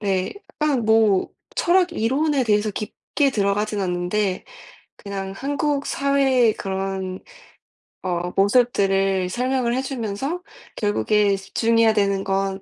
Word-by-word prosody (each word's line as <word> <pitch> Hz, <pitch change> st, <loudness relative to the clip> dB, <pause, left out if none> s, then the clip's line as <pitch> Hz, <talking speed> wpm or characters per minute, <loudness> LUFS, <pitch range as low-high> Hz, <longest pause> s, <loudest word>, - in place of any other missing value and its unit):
네. 190 Hz, -3 st, -1 dB, 0.3 s
약간 285 Hz, -6 st, +1 dB
뭐 220 Hz, -3 st, +3 dB, 0.3 s
철학 360 Hz, 0 st, +2 dB
이론에 275 Hz, +2 st, +1 dB
대해서 210 Hz, -1 st, +2 dB
깊게 245 Hz, +7 st, -2 dB
들어가진 205 Hz, -1 st, 0 dB
않는데 185 Hz, +2 st, -1 dB, 0.5 s
그냥 195 Hz, -1 st, -6 dB
한국 285 Hz, +2 st, -1 dB
사회의 270 Hz, -5 st, +2 dB
그런 190 Hz, -1 st, -4 dB, 0.8 s
어 180 Hz, -1 st, -2 dB
모습들을 195 Hz, -3 st, +2 dB
설명을 250 Hz, +2 st, 0 dB
해 260 Hz, -, 0 dB
주면서 265 Hz, -, -4 dB, 0.3 s
결국에 210 Hz, -1 st, +2 dB
"집중해야 225 Hz, +3 st, +2 dB
되는 200 Hz, -2 st, +1 dB
건 195 Hz, 0 st, -1 dB
210 Hz, 245 characters per minute, -22 LUFS, 195-260 Hz, 0.8 s, 뭐